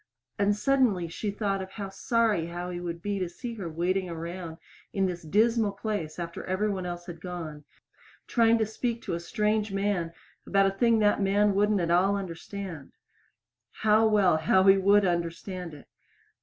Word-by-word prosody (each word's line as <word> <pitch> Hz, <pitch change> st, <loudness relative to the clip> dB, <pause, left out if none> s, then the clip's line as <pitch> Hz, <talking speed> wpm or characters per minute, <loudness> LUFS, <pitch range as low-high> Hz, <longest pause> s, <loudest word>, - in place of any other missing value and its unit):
And 205 Hz, 0 st, +3 dB
suddenly 230 Hz, -7 st, +2 dB
she 205 Hz, +6 st, -4 dB
thought 200 Hz, -1 st, -1 dB
of 190 Hz, -, -6 dB
how 200 Hz, -2 st, -5 dB
sorry 210 Hz, -3 st, +1 dB
Howie 175 Hz, +1 st, -5 dB
would 170 Hz, -1 st, -5 dB
be 205 Hz, -1 st, -1 dB
to 180 Hz, -2 st, -2 dB
see 235 Hz, +7 st, -7 dB
her 195 Hz, -7 st, -5 dB
waiting 180 Hz, +3 st, -1 dB
around 170 Hz, 0 st, -6 dB, 0.4 s
in 195 Hz, -1 st, +1 dB
this 175 Hz, -2 st, -3 dB
dismal 215 Hz, +5 st, +2 dB
place 200 Hz, -7 st, -4 dB
after 170 Hz, -1 st, -5 dB
every 190 Hz, +3 st, 0 dB
one 185 Hz, -2 st, -3 dB
else 175 Hz, 0 st, -6 dB
had 170 Hz, -2 st, -9 dB
gone, 165 Hz, -5 st, -7 dB, 0.6 s
trying 230 Hz, -1 st, +3 dB
to 220 Hz, -, +1 dB
speak 230 Hz, +2 st, -3 dB
to -, -, -3 dB
a 170 Hz, -, -1 dB
strange 210 Hz, +3 st, 0 dB
man 195 Hz, -4 st, -1 dB, 0.4 s
about 195 Hz, 0 st, +3 dB
a 195 Hz, -, +2 dB
thing 230 Hz, +4 st, +3 dB
that 210 Hz, -1 st, +3 dB
man 200 Hz, +1 st, +3 dB
wouldn't 205 Hz, 0 st, +2 dB
at 170 Hz, 0 st, 0 dB
all 190 Hz, +3 st, +3 dB
understand. 185 Hz, -3 st, -6 dB, 0.8 s
How 220 Hz, +1 st, +3 dB
well 200 Hz, -6 st, +4 dB
Howie 190 Hz, +4 st, +5 dB
would 200 Hz, +1 st, +4 dB
understand 170 Hz, 0 st, -3 dB
it! 145 Hz, -, -15 dB
195 Hz, 170 wpm, -28 LUFS, 175-210 Hz, 0.8 s, Howie